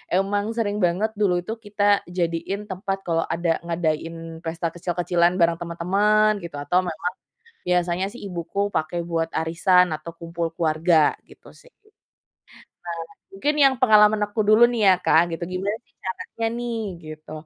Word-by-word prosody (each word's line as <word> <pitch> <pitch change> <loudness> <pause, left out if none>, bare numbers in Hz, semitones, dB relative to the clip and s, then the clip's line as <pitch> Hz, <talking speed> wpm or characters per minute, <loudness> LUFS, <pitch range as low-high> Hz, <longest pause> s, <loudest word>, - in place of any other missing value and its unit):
emang 205 +2 +1
sering 205 -2 0
banget 190 +6 0
dulu 195 -4 +3
itu 220 - -4
kita 205 0 -2 0.3
jadiin 175 +3 -2
tempat 195 +1 -3
kalau 165 -1 +1
ada 165 0 0
ngadain 165 0 -3
pesta 165 +1 -2
kecil-kecilan 175 0 +1
bareng 170 0 +3
teman-teman 205 +5 +2
gitu 165 -4 -7
atau 145 +5 +1
memang, 175 +2 -3 0.6
biasanya 180 +1 +1
sih 245 - -11
ibuku 200 +3 -3
pakai 160 +2 -1
buat 165 -1 -1
arisan 180 +2 +3
atau 155 +2 -9
kumpul 170 0 -4
keluarga 160 -1 +3
gitu - - -16
sih, - - -19 1.2
nah 170 -1 -5 0.3
mungkin 290 +10 -1
yang 270 -1 +6
pengalaman 215 -3 +6
aku 210 +2 -2
dulu 215 +3 +6
nih 225 -5 +3
ya 185 - +6
Kak 170 +1 +4
gitu 170 - -6
gimana 195 +4 -2
sih - - -37
caranya 200 +4 -4
nih 235 -1 -3 0.2
gitu, 155 0 -10
180 Hz, 150 wpm, -23 LUFS, 165-205 Hz, 1.2 s, yang